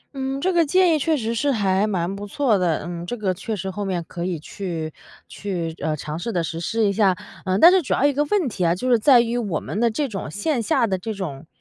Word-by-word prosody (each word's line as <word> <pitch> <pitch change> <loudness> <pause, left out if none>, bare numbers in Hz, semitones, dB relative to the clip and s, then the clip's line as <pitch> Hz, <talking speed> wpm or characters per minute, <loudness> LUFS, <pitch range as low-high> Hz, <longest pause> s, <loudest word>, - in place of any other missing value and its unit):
嗯， 270 0 -3
这 375 +4 +1
个 340 -1 +4
建 350 +2 +4
议 305 - +2
确 315 +2 +1
实 230 -1 -2
是 280 +5 +1
还 200 -3 +1
蛮 185 -1 -1
不 205 +1 -7
错 240 0 +1
的， 175 -5 0
嗯 170 0 -5
这 235 +8 -4
个 195 -3 0
确 215 +4 -4
实 190 0 -4
后 205 +2 -4
面 180 -4 -2
可 170 -1 -5
以 180 -2 -2
去 165 -2 -5 0.3
去 175 -5 -4
呃 155 - 0
尝 150 +2 -5
试 230 +6 -3
地 175 -4 0
实 165 0 -4
施 220 +6 0
一 200 - +2
下。 195 -3 +3 0.3
呃 185 0 +1
但 335 - +8
是 375 -1 +4
主 270 - -1
要 280 - +2
一 290 - +4
个 290 +2 +1
问 360 0 +1
题 205 -6 -3
啊， 170 0 +3
就 250 +8 -4
是 240 -3 +4
在 250 +1 +6
于 235 +1 -1
我 200 -9 -2
们 210 - -5
的 235 - +3
这 280 +6 -1
种 195 - -5
线 235 - -1
下 225 +2 +2
的 190 -4 -1
这 220 +3 -4
种 160 -6 -6
205 Hz, 290 characters per minute, -22 LUFS, 180-255 Hz, 0.3 s, 但